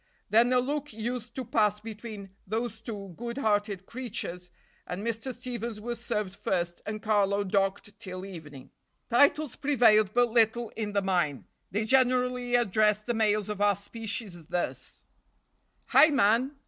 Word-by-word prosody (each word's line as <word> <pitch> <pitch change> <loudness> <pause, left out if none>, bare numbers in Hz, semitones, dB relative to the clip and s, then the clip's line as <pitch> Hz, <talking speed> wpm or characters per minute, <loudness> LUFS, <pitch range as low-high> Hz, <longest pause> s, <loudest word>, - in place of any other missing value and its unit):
Then 230 +3 +5
a 255 - +4
look 285 +2 -1
used 235 +2 -5
to 260 - -4
pass 210 -2 +2
between 215 -2 -8 0.2
those 220 +1 -3
two 200 -5 -7
good 235 +4 -5
hearted 205 -5 0
creatures, 210 -8 -5 0.4
and 190 +4 -5
Mr. 230 +3 -2
Stevens 235 -3 -5
was 235 +2 -5
served 210 -5 -2
first 175 -3 -2
and 215 0 -4
Carlo 205 -2 +2
docked 200 +2 -1
till 185 -3 -7
evening. 155 -8 -10 0.4
Titles 285 +2 +4
prevailed 230 -8 +4
but 245 0 +4
little 230 0 +2
in 210 -2 -5
the 200 -1 +1
mine. 175 -8 0 0.2
They 210 +3 -1
generally 250 0 +2
addressed 215 -2 +2
the 240 - 0
males 215 -2 +1
of 210 -1 -4
our 205 -1 +4
species 200 -4 -6
thus: 175 - -4 0.8
"Hi! - - +7
man!" 255 0 +2
215 Hz, 145 wpm, -28 LUFS, 200-240 Hz, 0.8 s, Hi